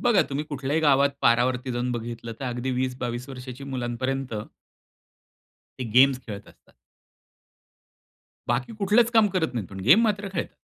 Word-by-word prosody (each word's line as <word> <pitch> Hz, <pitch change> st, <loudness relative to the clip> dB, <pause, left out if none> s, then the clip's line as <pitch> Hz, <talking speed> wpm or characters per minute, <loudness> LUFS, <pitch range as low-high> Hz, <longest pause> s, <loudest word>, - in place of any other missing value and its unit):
बघा 240 Hz, -5 st, +4 dB
तुम्ही 145 Hz, +1 st, -3 dB
कुठल्याही 145 Hz, +1 st, -2 dB
गावात 140 Hz, -2 st, +4 dB
पारावरती 125 Hz, +2 st, +2 dB
जाऊन 120 Hz, +1 st, -1 dB
बघितलं 115 Hz, 0 st, -5 dB
तर -, -, -4 dB
अगदी 125 Hz, +1 st, -3 dB
20-22 125 Hz, -1 st, -3 dB
वर्षाच्या 130 Hz, 0 st, -8 dB
मुलांपर्यंत 130 Hz, 0 st, -3 dB, 1.4 s
ते 130 Hz, -, -3 dB
गेम्स 130 Hz, +1 st, +6 dB
खेळत 100 Hz, -3 st, -8 dB
असतात. -, -, -23 dB, 1.7 s
बाकी 120 Hz, -, -1 dB
कुठलंच 215 Hz, +4 st, +4 dB
काम 225 Hz, -3 st, +5 dB
करत 160 Hz, -6 st, 0 dB
नाहीत, 110 Hz, -7 st, -3 dB
पण 95 Hz, -1 st, -8 dB
गेम 175 Hz, +11 st, +8 dB
मात्र 205 Hz, -3 st, 0 dB
खेळतात. 170 Hz, -, -4 dB
130 Hz, 140 wpm, -25 LUFS, 120-150 Hz, 1.7 s, गेम